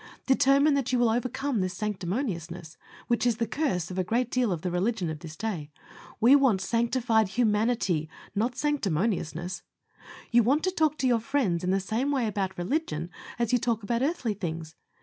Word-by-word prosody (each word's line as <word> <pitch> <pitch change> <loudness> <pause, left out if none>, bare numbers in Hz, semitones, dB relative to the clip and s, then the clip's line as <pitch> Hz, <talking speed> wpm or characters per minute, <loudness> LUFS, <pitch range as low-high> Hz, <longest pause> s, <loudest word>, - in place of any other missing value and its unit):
Determine 280 +2 +4
that 275 -3 0
you 250 - +2
will 240 -2 +3
overcome 250 +2 -1
this 185 -1 -2
sanctimoniousness, 180 - -3 0.3
which 235 - +1
is 240 -3 +2
the 230 - 0
curse 220 - -1
of 185 - -3
a - - +2
great 235 +6 0
deal 250 -4 +1
of 170 -3 -3
the 180 - -1
religion 185 -1 0
of 155 - -6
this 160 -1 -9
day. 180 -7 -4 0.5
We 245 +5 +7
want 265 -9 +4
SANCTIFIED 230 +1 +1
HUMANITY, 210 -6 +1 0.2
not 235 +4 0
sanctimoniousness. 190 - -1 0.7
You 240 0 +6
want 275 +7 +2
to 370 - +1
talk 310 -4 +1
to 265 - +1
your 240 -2 +3
friends 225 -9 0
in 180 - 0
the 195 +1 +2
same 220 +8 -1
way 270 -4 +1
about 195 -3 -2
religion, 175 - -2 0.3
as 235 0 0
you 245 - +4
talk 230 -2 -1
about 235 +3 -1
earthly 270 -6 0
things. 165 -4 -5
225 Hz, 185 wpm, -27 LUFS, 180-255 Hz, 0.7 s, We